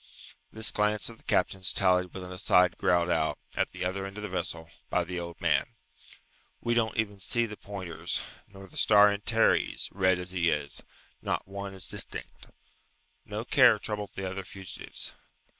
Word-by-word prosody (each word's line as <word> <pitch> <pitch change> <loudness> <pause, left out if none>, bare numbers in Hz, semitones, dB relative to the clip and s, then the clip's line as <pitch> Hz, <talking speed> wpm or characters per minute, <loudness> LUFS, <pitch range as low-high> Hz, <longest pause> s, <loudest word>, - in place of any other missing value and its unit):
This 110 0 +1
glance 105 +1 +1
of 115 - -11
the - - -21
captain's 95 -1 +1
tallied 90 -1 +3
with 95 - -7
an 90 - -8
aside 90 -1 +4
growled 85 0 +3
out, 80 -2 +1 0.2
at - - 0
the - - -5
other 95 +1 -2
end 100 +1 -10
of 105 - -6
the 105 - -4
vessel, 85 -3 -2 0.2
by 90 - +2
the 90 +1 -4
old 85 0 -7
man, - - +1 0.8
"We 120 - 0
don't 115 -2 +1
even 105 -3 -1
see 120 +5 +1
the 105 -2 -7
pointers, 95 -5 -4 0.3
nor 95 -1 -12
the - - -11
star 105 -1 +7
Antares, 110 +3 +2
red 95 -1 +3
as 90 0 -5
he 85 -2 +2
is. 75 -2 -1 0.4
Not - - -2
one 100 0 -6
is 95 - 0
distinct." - - -4 0.8
No 105 +2 -5
care 125 -5 +6
troubled 105 -1 -4
the 95 -1 -3
other 95 +1 -4
fugitives. 95 0 -6
95 Hz, 175 wpm, -29 LUFS, 90-105 Hz, 0.8 s, star